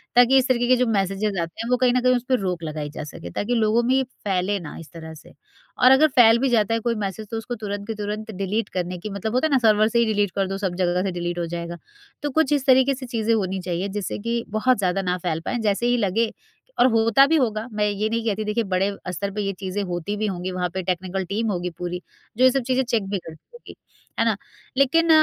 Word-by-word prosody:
ताकि 245 +2 +6
इस 260 - +3
तरीके 245 -2 +1
के 255 - +5
जो 250 - +2
मैसेजेज़ 195 -1 0
आते 165 +6 -5
हैं 230 - -5
वो 250 - +3
कहीं 250 -1 +3
न 250 - +2
कहीं 255 0 +4
उसपे 250 +1 0
रोक 180 -3 -2
लगाई 155 -2 -4
जा 150 - -7
सके। 145 - -9
ताकि 230 - -1
लोगों 225 +1 +2
में 260 +3 +3
फैले 200 -5 -2
ना 160 -5 -8
इस 165 - -12
तरह 160 -1 -9
से 155 - -15 0.5
और 255 - +8
अगर 280 +4 +6
फैल 235 -5 +6
भी 265 +1 +1
जाता 225 -2 +2
है 230 - +1
कोई 235 +1 -1
मैसेज 200 +2 -5
तो 225 - -2
उसको 235 +2 -5
तुरंत 205 -1 -5
के 225 - -2
तुरंत 210 +1 -4
डिलीट 200 +2 -2
करने 180 0 -3
की 210 - -6
मतलब 200 +2 -4
होता 255 +5 +2
है - - -6
ना 275 - +5
सर्वर 215 -2 +4
से 235 +1 +1
ही 235 - +4
डिलीट 205 -3 +1
कर 195 -1 +1
दो 195 +1 -3
सब 190 -3 -2
जगह 180 0 +1
से 195 - -1
डिलीट 175 0 -3
हो 170 - -1
जाएगा। 170 0 -5 0.5
तो 295 - 0
कुछ 315 +1 +2
इस 280 -2 0
तरीके 265 +1 +5
से 260 0 -8
चीज़ें 230 -2 0
होनी 190 -3 -1
चाहिए 180 +2 -2
जिससे 200 -1 -4
कि 230 +2 -2
बहुत 215 +4 +2
ज़्यादा 190 -1 0
ना 180 -1 -1
फैल 170 -3 -2
पाएँ - - -1
जैसे 215 +1 0
ही 245 - +3
लगे 220 +1 +1 0.5
और 250 - +7
होता 225 +4 +5
भी 325 - +3
होगा 225 -6 0
मैं 210 -1 0
ये 205 +1 -1
नहीं 230 0 -2
कहती 215 -1 0
देखिए 210 +2 0
बड़े 190 0 0 0.2
स्तर 200 +3 -3
पर 205 - -5
ये 195 -1 -2
चीज़ें 190 +1 -3
होती 180 +2 -3
भी 215 +1 -1
होंगी 185 -1 -3
वहाँ 180 -1 -2
पे 190 - -2
टेक्निकल 185 +1 -2
टीम 210 +5 -2
होगी 180 -1 -2
पूरी। 180 0 -4 0.4
जो 255 - +3
ये 260 - +7
सब 270 0 0
चीज़ें 260 0 +2
चेक 235 -4 0
भी 200 - -1
करती 160 -2 -12
होगी। 475 - -13 0.4
है 230 - +3
ना? 225 -2 +2 0.4
लेकिन 330 +5 +3
210 Hz, 260 wpm, -23 LUFS, 185-240 Hz, 0.5 s, और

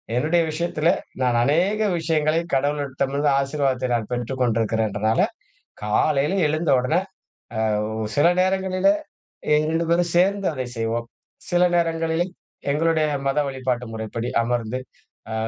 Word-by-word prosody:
என்னுடைய 160 +7 +2
விஷயத்தில 165 0 0 0.3
நான் 125 -2 +2
அநேக 180 - +2 0.2
விஷயங்களை 160 0 +1
கடவுளிடமிருந்து 140 0 0
ஆசீர்வாதத்தை 135 -2 0
நான் 115 -3 -1
பெற்றுக்கொண்டிருக்கிறேங்னால 115 -3 0 0.6
காலையில 140 - +1
எழுந்த 155 +2 -1
உடனே 140 +8 +1 0.9
ஆ - - -2 0.3
சில 145 - +5
நேரங்களிலே 190 +6 +2 0.6
2 155 +2 +2
பேரும் 170 0 +2
சேர்ந்து 195 +2 +3
அதை 130 -2 -3
செய்வோம். 115 +1 -2 0.4
சில 175 0 +3
நேரங்களிலே 165 0 0 0.5
எங்களுடைய 160 +1 +2 0.2
மத 135 - +1
வழிபாட்டு 130 -2 -2
முறைப்படி 110 +2 -4
அமர்ந்து 120 +1 -2 0.5
ஆ - - -3
145 Hz, 110 wpm, -23 LUFS, 125-165 Hz, 0.9 s, சில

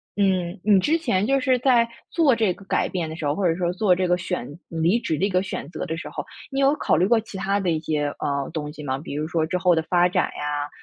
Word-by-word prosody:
嗯， 185 -3 0
你 205 -2 +5
之 300 - +2
前 210 - +1
就 275 +3 +2
是 255 -1 +2
在 240 -2 +3 0.2
做 300 -7 +4
这 220 -5 +1
个 200 - -15
改 - - +1
变 170 -4 -3
的 160 - -6
时 160 - -5
候， 145 - +1
或 190 -4 +1
者 165 - +1
说 175 -1 -1
做 185 -1 +3
这 185 0 0
个 175 - +3
选 180 -8 -4 0.2
离 165 +7 +1
职 160 - -2
的 190 - +1
一 - - 0
个 185 -1 +2
选 190 -6 -5
择 - - -5
的 160 - -3
时 - - -7
候， - - -5 0.3
你 270 - -2
有 275 +2 +4
考 - - +1
虑 180 +4 +3
过 235 +1 +4
其 220 -2 -10
他 195 +1 0
的 180 -3 0
一 160 - 0
些， 150 -2 -1
啊， 140 -1 -1
东 150 -2 -4
西 150 -1 -10
吗？ 135 -1 -2
比 145 -1 -7
如 155 +1 -2
说 160 -1 0
之 170 +3 -1
后 180 -1 +3
的 160 - +2
发 175 +2 +3
展 180 - +1
呀， 145 0 -3
180 Hz, 305 characters per minute, -23 LUFS, 160-205 Hz, 0.3 s, 你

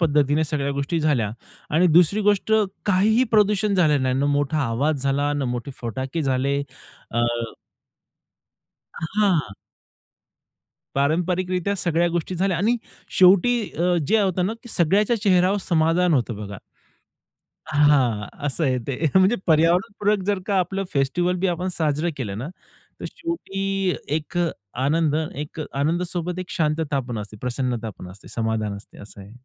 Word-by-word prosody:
पद्धतीने 150 -1 +2
सगळ्या 140 -2 -2
गोष्टी 155 +4 -1
झाल्या 135 -9 +1 0.4
आणि 180 +3 +5
दुसरी 180 +5 +5
गोष्ट 205 +1 +1 0.3
काहीही 215 +6 +3
प्रदूषण 210 -1 +3
झालं 150 -6 +3
नाही, 130 -1 +1
ना 140 - +1
मोठा 145 +1 +1
आवाज 140 +5 0
झाला, 140 +1 +1
न 145 - -1
मोठे 120 +3 -5
फटाके 130 +7 -3
झाले. 135 +1 0 0.6
अ 120 - +2 2.0
हां. 180 - +2 1.4
पारंपारिकरित्या 180 +6 0
सगळ्या 170 -1 +1
गोष्टी 175 +2 -2
झाल्या. 185 0 0
आणि 225 +6 +2 0.4
शेवटी 195 +6 +5 0.2
अ, 175 +1 +2
जे 220 +1 +3
होतं 185 -2 +1
ना, 215 - -1
की 240 - -12
सगळ्याच्या 200 +5 +2
चेहऱ्यावर 185 0 +3
समाधान 165 +1 +3
होतं 120 -5 0
बघा. 100 -1 -7 1.2
हां, 135 -8 +3 0.2
असं 145 +3 -1
आहे 130 -3 +2
ते 140 +3 -3
म्हणजे 190 +5 +5
पर्यावरणपूरक 185 +5 +2
जर 205 -2 +1
का 200 -2 +1
आपलं 195 +2 -1
फेस्टिव्हल 175 +6 +1
बी 190 - +4
आपण 180 +1 -1
साजरं 155 +1 0
केलं 105 -7 -4
ना, 130 +6 -5 0.5
तर - - -6
शेवटी 195 - -2 0.2
एक 160 +3 -4 0.5
आनंद 150 +1 +2 0.2
एक 150 +2 -6
आनंदासोबत 175 +4 -1
एक 185 - -6
शांतता 150 -3 0
पण 120 -3 -5
असते, 105 0 -7
प्रसन्नता 125 -1 -2
पण 90 - -8
असते, 95 - -15
समाधान 110 -2 -2
असते. 100 - -16
असं 100 -1 -12
आहे. 100 - -13
160 Hz, 140 wpm, -23 LUFS, 135-185 Hz, 2.0 s, आणि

